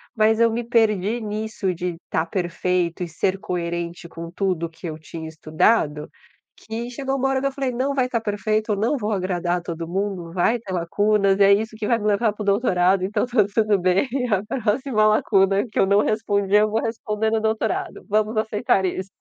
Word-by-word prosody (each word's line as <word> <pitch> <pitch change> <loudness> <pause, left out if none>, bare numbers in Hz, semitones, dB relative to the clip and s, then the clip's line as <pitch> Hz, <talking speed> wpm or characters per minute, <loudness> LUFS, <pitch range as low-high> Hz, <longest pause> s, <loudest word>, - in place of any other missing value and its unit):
mas 220 0 +3
eu 230 0 +5
me 235 +2 -2
perdi 225 -1 +1
nisso 215 -2 -3
de 175 -1 -4
tá 160 - 0
perfeito 175 0 -1
e - - -3
ser 185 +4 -1
coerente 170 -1 -4
com 165 0 -8
tudo 180 -3 -1
que 165 +1 -9
eu 155 -1 -5
tinha 160 +1 -8
estudado, 155 0 +1 0.5
que 230 +2 -6
chegou 270 +2 -3
uma 270 0 +1
hora 265 -1 0
que - - -3
eu 275 - +1
falei: 270 -1 -2
"Não 260 +3 -1
vai 255 -2 +1
tá 235 - 0
perfeito, 215 0 -1
eu - - +2
não 225 +8 0
vou 215 -3 -2
agradar 180 -3 -1
todo 170 -1 -5
mundo, 185 -2 -3
vai 190 +6 +2
ter 205 -5 -8
lacunas 195 +3 +2
e 200 - +5
é 200 0 +7
isso 220 +2 -1
que 215 -1 -4
vai 235 +1 +2
me 210 - -2
levar 210 +1 +2
pro 210 - -6
doutorado, 195 -3 +2
então, 210 +5 0
tá 235 -4 +3
tudo 215 -2 +3
bem. 185 +7 +2 0.3
A 195 -1 +1 0.2
próxima 225 0 +1
lacuna 200 -2 +3
que - - -7
eu - - +5
não 200 +1 +4
respondi, 205 -2 0
eu 210 0 +4
vou 225 - +1
responder 220 -1 -2
no 220 0 +1
doutorado, 220 0 -2
vamos 215 +2 +1
aceitar 215 -3 +1
isso." 185 +1 -3
205 Hz, 205 wpm, -22 LUFS, 180-220 Hz, 0.5 s, é